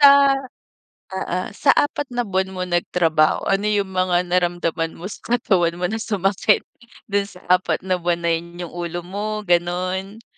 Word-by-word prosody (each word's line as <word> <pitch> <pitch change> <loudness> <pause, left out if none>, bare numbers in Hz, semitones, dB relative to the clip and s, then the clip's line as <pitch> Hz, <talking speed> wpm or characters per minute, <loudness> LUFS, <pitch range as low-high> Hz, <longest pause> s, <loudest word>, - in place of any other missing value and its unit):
Sa 280 -1 +10 1.0
oo. 190 -1 -2
Sa 275 +7 +2
4 290 0 +1
na 245 - +1
buwan 190 -3 -1
mo 185 - -3
nagtrabaho, 175 -3 +2
ano 195 +2 +1
yung 205 -2 +1
mga 185 -1 +2
naramdaman 175 -2 0
mo 185 +5 -7
sa - - -8 0.2
katawan 180 -8 +2
mo 180 +1 -2
na 220 - -2
sumakit 205 -1 +1 0.5
do'n 200 0 +1
sa 180 -2 -15
4 180 0 +2
na 185 -1 0
buwan 170 0 -1
na 170 - +1
yun? 170 +1 -3
Yung 170 - -6
ulo 175 0 -4
mo, 210 +4 -4
gano'n? 185 +3 -1
185 Hz, 170 wpm, -21 LUFS, 175-200 Hz, 1.0 s, Sa